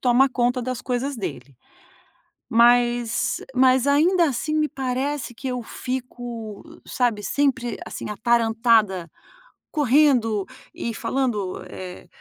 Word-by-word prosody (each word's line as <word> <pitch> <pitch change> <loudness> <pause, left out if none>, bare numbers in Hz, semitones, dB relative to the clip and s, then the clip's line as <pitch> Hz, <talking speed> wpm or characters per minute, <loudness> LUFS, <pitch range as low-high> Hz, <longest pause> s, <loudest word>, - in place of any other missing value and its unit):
toma 255 +2 +4
conta 245 0 0
das 255 0 -3
coisas 255 +2 -2
dele, 140 - -6 0.9
mas, 240 -1 +3
eh, - - -11
mas 260 +1 +4
ainda 335 +5 +4
assim 285 +4 -2
me 305 -1 +1
parece 265 0 -3
que 265 +3 -7
eu 250 -2 -3
fico, 240 -4 -6 0.2
sabe, 235 -5 0
sempre 255 -1 0
assim - - -6
atarantada, 225 -4 +2 0.6
correndo 255 - +3 0.3
e 230 - -3
falando, 230 -6 -2
eh: 180 -1 -9
245 Hz, 115 wpm, -23 LUFS, 225-265 Hz, 0.9 s, toma